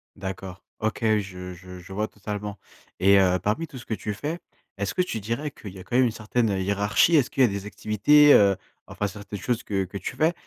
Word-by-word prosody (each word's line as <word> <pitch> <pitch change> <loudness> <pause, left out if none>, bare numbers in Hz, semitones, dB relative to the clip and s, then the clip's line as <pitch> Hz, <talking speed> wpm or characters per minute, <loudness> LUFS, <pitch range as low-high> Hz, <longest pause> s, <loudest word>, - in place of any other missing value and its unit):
D'accord, 95 -1 -7 0.2
OK, 110 +3 -1 0.2
je 90 -2 -7
je 90 0 -11
je 95 +2 -11
vois 105 +2 -1
totalement 105 0 -6 0.4
et 100 +1 +6
heu, 90 -1 +4
parmi 135 +11 -1
tout 130 - -11
ce 120 - -10
que 110 - -3
tu 105 0 -3
fais, 150 +11 -4 0.4
est-ce 100 -1 -2
que 180 - +3
tu 115 -11 -4
dirais 115 +8 -3
qu'il 100 -8 -10
y 95 - -11
a - - -9
quand 120 - -5
même 130 0 +5
une 115 - +1
certaine, 110 +1 -1
heu, 95 -1 0
hiérarchie? 100 - +3
Est-ce 140 -4 +4
qu'il 135 - -1
y - - +8
a - - +2
des 100 0 -4
activités, 140 +9 +5
heu, 100 -2 +6 0.3
enfin, 105 - -2
certaines 105 0 -8
choses, 120 +3 -1
que 95 -2 -1
que 95 +2 -7
tu 125 - -5
fais 160 +5 +2
105 Hz, 240 wpm, -25 LUFS, 95-120 Hz, 0.4 s, y